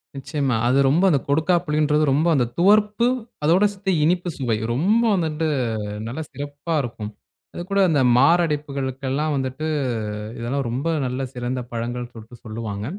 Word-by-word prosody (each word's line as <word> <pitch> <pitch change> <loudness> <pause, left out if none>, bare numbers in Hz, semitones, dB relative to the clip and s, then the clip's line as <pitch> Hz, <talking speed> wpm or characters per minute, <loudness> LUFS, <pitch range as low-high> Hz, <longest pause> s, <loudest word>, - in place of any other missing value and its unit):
நிச்சயமா. 140 -2 -1
அது 130 +2 +3
ரொம்ப 165 +7 +3
அந்தக் 140 -5 0
கொடுக்காப்புளின்றது 155 -1 +2
ரொம்ப 150 +5 +2
அந்தத் 120 -4 0
துவர்ப்பு, 210 +4 +4 0.4
அதோட 170 +6 +4
சேத்து 195 0 -2
இனிப்பு 175 +3 +1
சுவை. 120 -5 0 0.2
ரொம்ப 205 - +2
வந்துட்டு 160 -2 -1 0.6
நல்லா 130 +8 -4
சிறப்பா 145 +3 -5
இருக்கும். 115 -4 -6 0.4
அது - - -6
கூட 200 - +2
அந்த 150 -4 +2 0.2
மாரடைப்புகளுக்கெல்லாம் 140 -1 +1
வந்துட்டு 135 +3 -3 0.7
இதெல்லாம் 125 +3 -2
ரொம்ப 130 +7 -2 0.2
நல்ல 130 +1 -3
சிறந்த 125 0 -3
பழங்கள்னு 120 +1 -4
சொல்ட்டு 115 +1 -12
சொல்லுவாங்க. 110 -2 -5
140 Hz, 135 wpm, -22 LUFS, 125-165 Hz, 0.7 s, துவர்ப்பு